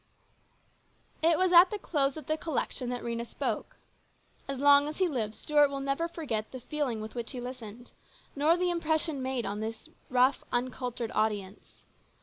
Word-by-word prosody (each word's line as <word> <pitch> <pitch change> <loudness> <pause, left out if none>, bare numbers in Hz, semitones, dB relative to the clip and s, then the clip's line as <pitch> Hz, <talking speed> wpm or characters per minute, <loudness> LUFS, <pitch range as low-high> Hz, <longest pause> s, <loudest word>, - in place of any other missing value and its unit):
It 325 0 +4
was 370 -1 +2
at 350 +2 +9
the 420 - -3
close 280 -7 0
of 310 - -8
the 310 - 0
collection 295 -5 -3
that 245 -1 -4
Rhena 235 0 -2
spoke. 235 - -4 0.7
As 275 -1 -3
long 285 +1 +6
as 300 - -5
he 375 - +3
lives 225 -8 -2
Stuart 295 -1 +3
will 275 0 -4
never 275 +4 -1
forget 265 -11 -4
the 260 - -7
feeling 255 -4 -2
with 215 0 -7
which 235 +2 -5
he 255 - -5
listened, 245 -2 -8 0.4
nor 305 +4 +3
the 360 0 +1
impression 315 -3 0
made 260 -2 -2
upon 205 +1 -3
the 220 +1 -3 0.3
rough, 255 +2 +3
uncultured 245 -1 -2
audience. 205 -2 -3
265 Hz, 170 wpm, -29 LUFS, 235-310 Hz, 0.7 s, at